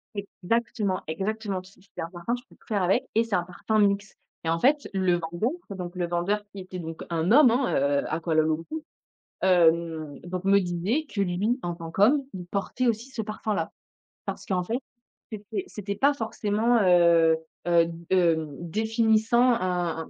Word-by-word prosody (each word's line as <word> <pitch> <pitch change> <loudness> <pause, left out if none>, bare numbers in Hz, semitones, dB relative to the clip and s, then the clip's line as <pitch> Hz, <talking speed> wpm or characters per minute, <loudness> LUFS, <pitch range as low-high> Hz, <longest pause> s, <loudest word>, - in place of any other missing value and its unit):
Exactement, 200 0 -2
exactement, 195 +3 -2
q 185 +1 -17
c'est 195 - -9
un 165 - -4
parfum, 175 +6 -4
tu 245 - -10
peux - - -19
tout - - -27
faire 205 -4 0
avec 195 +9 +2
et 225 - +4
c'est 225 -4 -1
un 175 - +1
parfum 185 +5 -2
mixte 200 0 +1 0.3
et 165 - -1
en 165 0 +1
fait 285 - +2
le 185 -2 +2
vendeur 175 - -2 0.2
donc 180 -2 -6
le 175 -1 -1
vendeur 175 +5 0
qui 200 - -9
était 185 0 -7
donc 165 -1 -6
un 170 +4 +1
homme, 265 -2 +7
heu, 145 - +1
à 160 - 0
Kuala 160 -1 +2
Lumpur, 165 - -2 0.6
hem, 165 -4 +2
donc 180 +1 -5
me 200 0 +5
disait 185 - -1
que 205 - -3
lui, 200 +7 0
en 175 -1 -2
tant 165 -1 -8
qu'homme, 260 - +4
il 180 -2 -6
portait 200 +7 -1
aussi 230 +3 -1
ce 245 -4 -4
parfum-là. 215 0 -3 0.5
Parce - - -5
qu'en 180 -2 0
fait, 230 +6 -1 0.5
c'était 215 - -5
c'était 200 -1 -5
pas 280 +4 +4
forcément, 225 -1 +1
heu, 170 -3 +5 0.3
heu, 170 -1 +5 0.3
heu, 165 -4 +3
définissant 220 +5 +2
un 175 -6 -1
190 Hz, 175 wpm, -26 LUFS, 170-220 Hz, 0.6 s, homme